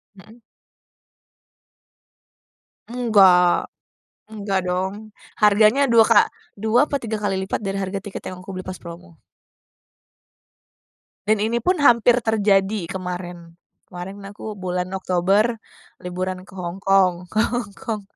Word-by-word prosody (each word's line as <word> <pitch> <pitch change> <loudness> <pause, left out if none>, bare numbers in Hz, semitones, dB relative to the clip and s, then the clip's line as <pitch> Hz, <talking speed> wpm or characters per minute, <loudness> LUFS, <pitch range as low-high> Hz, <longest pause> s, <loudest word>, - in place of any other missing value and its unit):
Mhm. 220 +5 -17 2.5
Enggak. 195 -7 +4 0.6
Enggak 200 -3 -2
dong, 190 +4 -3 0.3
harganya 215 +6 +4
2 230 -1 +6
ka - - +6 0.3
2 220 +7 +2
apa 280 -2 -3
3 220 -2 -3
kali 205 -2 -1
lipat 190 - -2
dari 195 - -2
harga 190 +1 -3
tiket 195 0 -8
yang 185 - -9
aku 185 +1 -9
beli 185 - -5
pas 185 0 -7
promo. 170 0 -12 2.1
Dan 215 -1 +2
ini 230 +2 0
pun 365 +11 +1
hampir 240 -1 +4
terjadi 205 -3 +1
kemarin. 175 -2 -7 0.2
Kemarin 190 +3 -9
aku 205 +2 -8
bulan 180 -2 -3
Oktober 195 +5 +1 0.4
liburan 185 +1 -5
ke - - -15
Hong 180 0 -6
Kong, 185 -2 +2
ke 215 - -2
Hong 240 -2 -2
Kong. 225 -5 -5
195 Hz, 120 wpm, -21 LUFS, 185-220 Hz, 2.5 s, 2